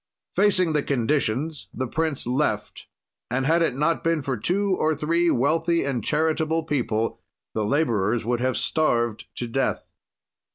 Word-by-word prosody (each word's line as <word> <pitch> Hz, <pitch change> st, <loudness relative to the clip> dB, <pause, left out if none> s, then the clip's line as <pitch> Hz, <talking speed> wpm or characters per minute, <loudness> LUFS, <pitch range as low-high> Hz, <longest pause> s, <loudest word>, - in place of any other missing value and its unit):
"Facing 185 Hz, -5 st, +3 dB
the 150 Hz, -, +2 dB
conditions 140 Hz, +2 st, -1 dB
the 130 Hz, -, -3 dB
prince 155 Hz, +2 st, -1 dB
left, 130 Hz, +5 st, -1 dB, 0.4 s
and 130 Hz, +2 st, 0 dB
had 165 Hz, +4 st, +3 dB
it 160 Hz, -6 st, +1 dB
not 150 Hz, +4 st, +1 dB
been 165 Hz, -3 st, +1 dB
for 135 Hz, -2 st, -1 dB
two 190 Hz, -, 0 dB
or 155 Hz, -2 st, +1 dB
three 170 Hz, +4 st, +1 dB
wealthy 165 Hz, +6 st, +2 dB
and 130 Hz, -5 st, -2 dB
charitable 160 Hz, +2 st, +1 dB
people 120 Hz, -7 st, -1 dB, 0.3 s
the 110 Hz, -, -1 dB
laborers 115 Hz, -4 st, +1 dB
would 120 Hz, 0 st, 0 dB
have 130 Hz, 0 st, 0 dB
starved 120 Hz, -8 st, 0 dB
to 120 Hz, -, -3 dB
death. 130 Hz, +3 st, -2 dB
145 Hz, 150 wpm, -24 LUFS, 120-160 Hz, 0.4 s, Facing